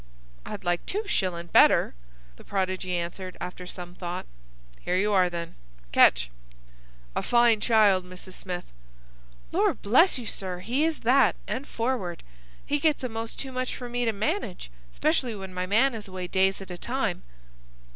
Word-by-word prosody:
"I'd 200 - -6
like 175 -1 0
two 415 +3 -1
shillin' 180 - -1
better," 170 - +5 0.4
the - - -15
prodigy 185 -2 -1
answered, 175 +2 -4
after 180 0 -6
some 180 -1 -7
thought. 175 -1 -5 0.5
"Here 180 - -1
you 205 +2 +2
are, 185 -2 +4
then! 170 -1 -5 0.4
Catch!—A - - 0
fine 235 -3 +4
child, 210 -5 +4
Mrs. 185 +1 -11
Smith!" 180 -2 -5 0.9
"Lor' - - +2
bless 265 - +4
you, 245 - -5
sir, 185 -4 -3
he 255 +10 +1
is 325 -1 -1
that, 260 +4 +4
and 255 +7 -3
forward. 225 -8 -2 0.4
He 290 - 0
gets 300 -2 +2
a'most 225 -2 -4
too 270 - -5
much 255 0 -2
for 245 -1 -7
me 245 0 -1
to 225 - +2
manage, 215 - -3 0.2
'specially 220 - 0
when 190 -2 -8
my 180 0 -2
man 230 +7 +4
is 220 -2 -6
away 185 -1 -5
days 190 +2 +2
at 190 - -8
a 175 - -7
time." - - -2
190 Hz, 160 wpm, -27 LUFS, 175-235 Hz, 0.9 s, better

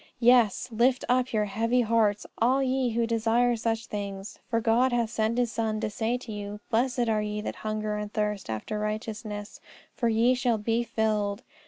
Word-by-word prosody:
Yes; 240 -2 +4
lift 245 +3 +2
up 255 +1 +2
your 215 -2 +1
heavy 230 +5 +1
hearts, 220 -3 +2
all 260 +4 +3
ye 260 -1 +1
who 230 0 +1
desire 230 +1 +2
such 225 0 -1
things, 200 -2 -6
for 230 -2 +1
God 235 +3 +3
hath 235 -2 0
sent 225 0 0
His 245 -2 +1
Son 220 -1 -1
to 220 -1 -2
say 225 +3 -1
to 245 -2 -9
you, 205 0 -6
Blessed 245 +1 +1
are 215 -1 +1
ye 210 0 -3
that - - -5
hunger 215 -1 -2
and 210 0 -5
thirst 210 - -2
after 110 - -3
righteousness, 215 0 -5 0.3
for 235 - 0
ye 230 +3 +4
shall 245 -2 +1
be 225 +2 0
filled. 215 -2 -1
225 Hz, 185 wpm, -27 LUFS, 210-240 Hz, 0.3 s, Yes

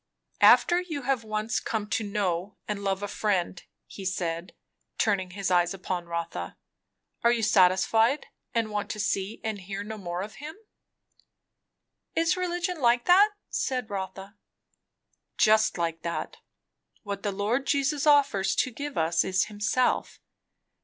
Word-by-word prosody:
"After 350 0 +6
you 315 -6 -5
have 260 -2 0
once 215 +1 -1
come 215 -2 -3
to 240 -3 0
know 200 -2 -2
and 205 -1 -3
love 195 0 -1
a - - -1
friend," 190 -4 -1 0.3
said 180 -3 -3
he, - - -23 0.4
turning 195 -4 +1
his 190 +1 -3
eyes 175 +1 +3
upon 180 -2 -4
Rotha, 170 - -4 0.7
"are 235 - +5
you 235 -2 0
satisfied, 220 +6 +3 0.3
and 225 -2 -1
want 205 -1 -3
to 210 - -4
see 200 0 -1
and 215 -3 -3
hear 195 +2 -5
no 215 +1 -7
more 175 -1 -4
of 210 +1 -9
him?" 310 +2 -7 1.6
"Is 330 0 +2
religion 355 -1 -2
like 240 0 +3
that?" 390 +4 +7 0.2
said 250 -4 -2
Rotha. 195 +1 -6 1.0
"Just 215 -1 +4
like 165 -1 -2
that. 170 +1 -4 0.7
What 200 -2 -5
the 205 - -1
Lord 215 +7 -1
Jesus 285 +1 +1
offers 280 -10 +4
to 255 - +1
give 285 +4 -6
us 160 0 +2
is 185 0 +1
himself. 210 +4 0
210 Hz, 145 wpm, -27 LUFS, 190-245 Hz, 1.6 s, that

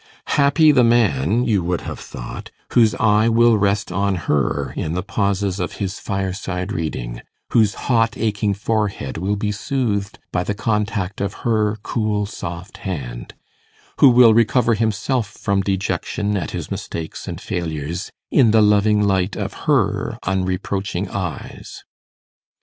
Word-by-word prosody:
Happy 150 +2 +5
the 130 -4 +4
man, 115 - +3
you 105 -4 +2
would 90 0 -1
have - - -6
thought, - - -8 0.2
whose 115 -3 +4
eye 110 -2 +3
will 115 0 +5
rest 100 -1 +1
on 100 +1 0
her 75 -5 -1
in 80 - -2
the 90 +1 -2
pauses 100 -2 -1
of 90 - -3
his 95 0 -4
fireside 95 -1 -3
reading 60 - -4 0.3
whose 110 -4 +3
hot 115 -2 +2
aching 105 -2 0
forehead 100 -9 -2
will 100 +4 0
be 105 +1 -1
soothed 105 -3 -2
by 90 - 0
the 100 - -2
contact 105 -3 -1
of 100 0 -1
her 110 -2 +1
cool 110 -3 -1
soft 90 -1 -7
hand 65 - -6 0.6
who 140 - +8
will 120 -2 +7
recover 115 +1 +3
himself 110 +2 0
from 100 0 -1
dejection 100 +1 -1
at 90 -6 -2
his - - -6
mistakes 80 -1 -5
and - - -5
failures 85 +2 -4 0.2
in 130 -6 +5
the 110 +1 +5
loving 105 0 +4
light 95 -1 +1
of - - -4 0.2
her - - +1
unreproaching 95 +1 -2
eyes! 90 -4 -6
100 Hz, 145 wpm, -20 LUFS, 95-110 Hz, 0.6 s, who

